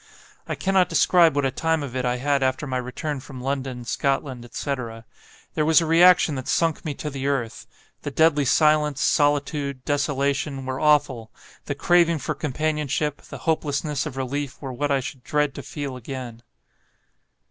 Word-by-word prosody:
I - - -2
cannot 190 -1 +2
describe 170 -5 +4
what 145 -1 +1
a 135 - +1
time 160 +3 0
of 130 -3 -7
it 130 -1 -1
I 125 0 +1
had 140 +2 +1
after 130 +2 0
my 130 -2 -2
return 130 +4 -4
from 130 -1 -10
London, 130 -2 -3
Scotland, 135 -1 -1
etc. 120 -2 -5 0.5
There 155 - 0
was 160 0 +5
a 165 - -1
reaction 170 0 +5
that 130 -2 -5
sunk 165 -2 +1
me 150 -3 -4
to 150 - -5
the 135 0 -3
earth; 125 -5 -2 0.3
the - - -4
deadly 150 0 +3
silence, 150 0 +3
solitude, 145 -3 +1
desolation, 140 -1 -1
were 130 0 -3
awful; 145 -7 +2 0.3
the - - -3
craving 170 -1 +3
for 155 +1 -3
companionship, 150 0 -2
the - - -10
hopelessness 150 -2 -1
of 135 -3 -8
relief, 140 +1 -3
were 135 -3 -6
what 145 +4 -2
I 140 -1 +2
should 130 -1 -8
dread 150 -3 0
to - - -7
feel 140 -3 -6
again. 125 -2 -7
140 Hz, 170 wpm, -24 LUFS, 130-150 Hz, 0.5 s, was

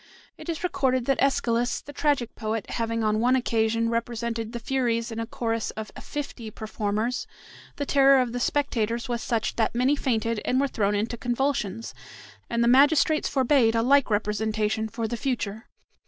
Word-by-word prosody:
It - - -10
is 330 0 -3
recorded 260 -8 +1
that 270 0 +1
Aeschylus, 245 -3 +1
the 290 - -12
tragic 280 -5 0
poet, 220 -2 -4
having 230 -1 -1
on 215 0 +1
one 250 +3 +3
occasion 230 -2 +1
represented 230 -1 -2
the 240 - -4
Furies 235 -2 -1
in 225 - -5
a 230 - -3
chorus 230 -1 -2
of 220 -1 -5
fifty 275 -6 -6
performers, 215 +2 -3 0.5
the 285 - -3
terror 275 -1 +5
of 250 -2 0
the 245 - -2
spectators 235 -3 0
was 240 -2 -2
such 230 -2 -1
that 230 0 +1
many 255 +4 +3
fainted 230 -5 -1
and 255 - +1
were 280 - +2
thrown 205 -5 0
into 225 +3 -2
convulsions, 240 -3 -2 0.6
and 235 0 +1
the - - +3
magistrates 290 +4 +4
forbade 260 -4 +3
a 230 - +2
like 275 +1 +4
representation 215 +1 0
for 225 +1 -3
the 235 - -3
future. 220 -4 -3
235 Hz, 170 wpm, -26 LUFS, 220-260 Hz, 0.6 s, terror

